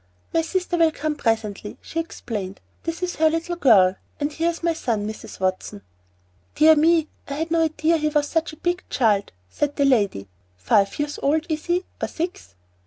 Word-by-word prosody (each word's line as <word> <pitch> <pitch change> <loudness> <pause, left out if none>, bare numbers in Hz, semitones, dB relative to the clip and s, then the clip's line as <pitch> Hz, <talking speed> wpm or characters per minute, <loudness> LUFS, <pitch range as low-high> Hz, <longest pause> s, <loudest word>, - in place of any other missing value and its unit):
"My 330 - +3
sister 360 +1 -1
will 330 -1 +5
come 310 0 -2
presently," 220 -5 -2
she 330 - -5
explained. 210 - -5 0.3
"This 330 +2 -3
is 360 - -2
her 315 0 +4
little 330 +2 -2
girl. 195 - +5 0.2
And 295 0 -2
here 330 +2 +1
is 335 0 -5
my 335 -1 +2
son, 230 -9 -2
Mrs. 215 - -8
Watson." 185 - -2 0.7
"Dear 315 +1 +7
me, 320 +1 +3 0.2
I 280 - -4
had 320 +3 -3
no 335 -1 +3
idea 315 +1 +1
he 305 -1 0
was 295 -1 +1
such 325 +1 -1
a 310 - -13
big 350 +2 -1
child," 210 -5 +1 0.2
said 290 - -2
that 280 - +2
lady. 200 - +2 0.3
"Five 195 - +2
years 295 0 -3
old, 310 +3 +1
is 310 -1 -2
he, 350 +1 +1 0.2
or - - 0
six? 335 - -5
305 Hz, 190 wpm, -23 LUFS, 220-330 Hz, 0.7 s, Dear